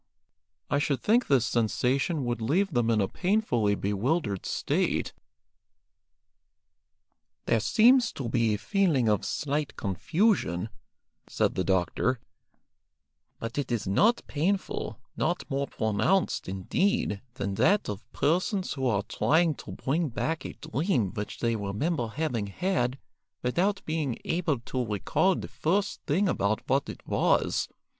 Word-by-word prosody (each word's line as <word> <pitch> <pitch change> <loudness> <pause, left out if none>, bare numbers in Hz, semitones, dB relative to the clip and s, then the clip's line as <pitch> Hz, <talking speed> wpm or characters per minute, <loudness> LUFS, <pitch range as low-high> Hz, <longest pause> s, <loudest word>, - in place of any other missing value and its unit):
I 140 - +1
should 145 -3 0
think 235 - +2
this 130 -5 +3
sensation 130 - 0
would 120 -1 -2
leave 175 - +1
them 120 -2 +2
in 110 -2 +3
a 95 - +1
painfully 150 - +1
bewildered 105 - -1
state." - - 0 2.3
"There 115 - +2
seems 240 - +5
to 130 - -4
be 115 -2 +2
a - - -3
feeling 165 - +1
of 105 -2 +2
slight 145 0 -2
confusion," 100 - 0 0.6
said - - 0
the 95 - -1
doctor; 95 +7 +1 1.2
"but 115 +5 -4
it 135 -3 -3
is 115 -3 -1
not 210 - +3
painful, 185 +7 -1 0.2
not 175 - -1
more 140 +1 0
pronounced, 110 - 0
indeed, 105 - 0
than 100 -5 -2
that 200 - +3
of 105 0 -6
persons 180 +5 0
who 135 -3 -1
are 100 -4 +1
trying 160 +9 +2
to - - -10
bring 155 +4 -1
back 160 +6 -2
a - - -5
dream 150 - -1
which 105 -2 -5
they 115 -1 +1
remember 115 - -1
having 120 -4 -2
had 130 - -1 0.5
without 180 +11 0
being 155 -6 -1
able 165 -6 0
to 125 +1 -2
recall 115 - +1
the - - -5
first 195 +6 -1
thing 185 +8 +2
about 105 - 0
what 135 +1 +1
it - - -9
was. - - +1
135 Hz, 135 wpm, -28 LUFS, 110-175 Hz, 2.3 s, seems